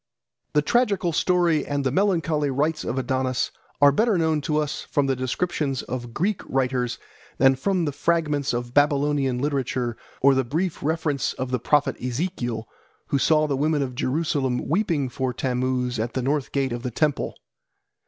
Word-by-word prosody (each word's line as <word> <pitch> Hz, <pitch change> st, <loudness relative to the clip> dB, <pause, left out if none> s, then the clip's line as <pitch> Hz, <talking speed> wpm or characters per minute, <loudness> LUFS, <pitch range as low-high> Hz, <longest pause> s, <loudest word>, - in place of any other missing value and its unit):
The 150 Hz, -, +3 dB
tragical 200 Hz, -4 st, +1 dB
story 170 Hz, -4 st, +2 dB
and 145 Hz, -1 st, -2 dB
the 130 Hz, -, +1 dB
melancholy 165 Hz, -4 st, +1 dB
rites 150 Hz, +4 st, 0 dB
of 125 Hz, -, -3 dB
Adonis 130 Hz, -1 st, 0 dB, 0.3 s
are 145 Hz, 0 st, +7 dB
better 220 Hz, +6 st, +2 dB
known 160 Hz, -2 st, +1 dB
to 150 Hz, +2 st, -1 dB
us 150 Hz, -1 st, -1 dB
from 145 Hz, -, +2 dB
the 135 Hz, -1 st, +1 dB
descriptions 135 Hz, +1 st, -1 dB
of 120 Hz, -1 st, -5 dB
Greek 185 Hz, -, -1 dB
writers 125 Hz, -2 st, 0 dB, 0.4 s
than 135 Hz, +1 st, +6 dB
from 180 Hz, +6 st, 0 dB
the 145 Hz, -, -1 dB
fragments 150 Hz, -1 st, 0 dB
of 120 Hz, 0 st, -3 dB
Babylonian 145 Hz, -2 st, +2 dB
literature 130 Hz, -3 st, -1 dB, 0.2 s
or 140 Hz, +1 st, +5 dB
the 135 Hz, 0 st, +2 dB
brief 160 Hz, +8 st, -2 dB
reference 150 Hz, -3 st, 0 dB
of 130 Hz, 0 st, -4 dB
the 125 Hz, -, 0 dB
prophet 145 Hz, +5 st, +2 dB
Ezekiel, 125 Hz, -4 st, -3 dB, 0.4 s
who 140 Hz, -, +1 dB
saw 155 Hz, +2 st, +4 dB
the 145 Hz, -2 st, 0 dB
women 150 Hz, +1 st, +1 dB
of 130 Hz, -2 st, -4 dB
Jerusalem 130 Hz, -1 st, -1 dB
weeping 165 Hz, -5 st, +1 dB
for 130 Hz, 0 st, -2 dB
Tammuz 125 Hz, -1 st, -1 dB
at 115 Hz, +2 st, -2 dB
the 130 Hz, -, -1 dB
north 140 Hz, +1 st, 0 dB
gate 135 Hz, -2 st, 0 dB
of 120 Hz, -, -4 dB
the 125 Hz, -, -3 dB
temple. 150 Hz, +4 st, 0 dB
140 Hz, 170 wpm, -24 LUFS, 130-155 Hz, 0.4 s, are